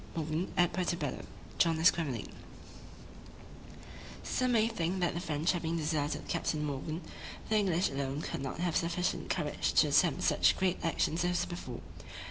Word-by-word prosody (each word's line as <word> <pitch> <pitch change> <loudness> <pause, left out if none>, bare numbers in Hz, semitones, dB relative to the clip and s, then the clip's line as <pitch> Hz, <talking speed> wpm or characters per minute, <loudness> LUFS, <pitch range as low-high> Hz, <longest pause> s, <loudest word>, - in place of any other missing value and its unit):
MORGAN 160 +2 -2
AT 175 -1 +3
PUERTO 180 -1 0
BELLO 145 -5 -4 0.3
JOHN 165 -2 +3
ESQUEMELING 160 - +2 1.9
Some 255 -1 0
may 225 -1 +4
think 185 -4 -1
that 175 -1 +1
the 170 - -3
French 160 -2 0
having 170 -2 -1
deserted 150 -2 -1
Captain 150 -1 -1
Morgan, 150 +4 -4 0.5
the 215 - +3
English 185 -5 +2
alone 135 +1 -2
could - - -4
not 135 -1 -4
have 170 0 -1
sufficient 170 +2 -1
courage - - -1
to - - +5
attempt - - +3
such - - +4
great 185 -1 0
actions 165 0 +1
as 175 0 +1
before. 130 -9 -7
165 Hz, 150 wpm, -32 LUFS, 150-180 Hz, 1.9 s, to